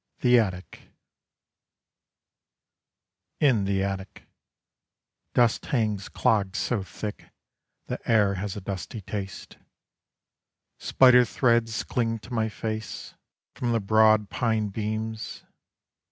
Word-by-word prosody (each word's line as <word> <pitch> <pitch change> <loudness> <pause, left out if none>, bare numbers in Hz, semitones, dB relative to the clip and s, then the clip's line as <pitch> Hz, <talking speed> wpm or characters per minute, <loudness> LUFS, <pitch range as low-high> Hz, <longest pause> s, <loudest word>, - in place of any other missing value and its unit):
THE 125 -1 +5
ATTIC 95 -5 -4 2.5
IN 125 -9 +3
THE 95 0 0
ATTIC 95 0 -5 1.1
Dust 120 -2 +2
hangs 105 -6 -1
clogged 100 -3 +1
so 120 -5 -1
thick 105 +2 -7 0.6
The - - -4
air 105 -3 +4
has 100 +1 -4
a - - -6
dusty 100 +3 -6
taste: 95 0 -7 1.2
Spider 125 -1 +6
threads 115 -2 +1
cling 115 -2 -1
to 120 +3 -11
my 110 -1 0
face, 110 -1 -5 0.4
From 120 -2 -2
the 115 - +2
broad 110 0 +4
pine 110 -3 0
beams. 110 +1 -4
110 Hz, 100 wpm, -26 LUFS, 100-115 Hz, 2.5 s, Spider